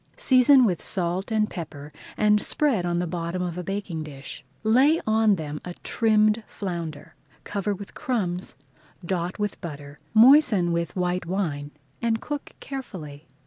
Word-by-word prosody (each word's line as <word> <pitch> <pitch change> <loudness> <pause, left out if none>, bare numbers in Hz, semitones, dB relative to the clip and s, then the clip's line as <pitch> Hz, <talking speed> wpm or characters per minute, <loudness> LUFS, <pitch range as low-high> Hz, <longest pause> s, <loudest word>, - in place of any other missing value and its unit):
Season 260 0 +6
with 180 -6 0
salt 185 +2 -2
and 215 -1 +1
pepper 150 -4 -7 0.3
and 210 0 +4
spread 240 -13 +1
on 175 0 0
the 175 - 0
bottom 170 +1 -3
of 175 -2 -3
a 180 - -4
baking 195 -3 -4
dish. 145 -3 -8 0.2
Lay 265 +9 +4
on 220 -1 +4
them 150 -3 -5
a 175 -1 -7
trimmed 215 -1 +3
flounder, 170 -6 -6 0.3
cover 205 0 -2
with 200 +1 -10
crumbs, 185 - -2 0.5
dot 175 0 -2
with 210 -1 -3
butter, 145 -3 -8 0.2
moisten 225 - +6
with 170 0 -2
white 180 -1 -1
wine, 160 -7 -2 0.3
and 225 -1 +1
cook 295 +3 -6
carefully. 165 - -8
185 Hz, 145 wpm, -25 LUFS, 170-220 Hz, 0.5 s, Season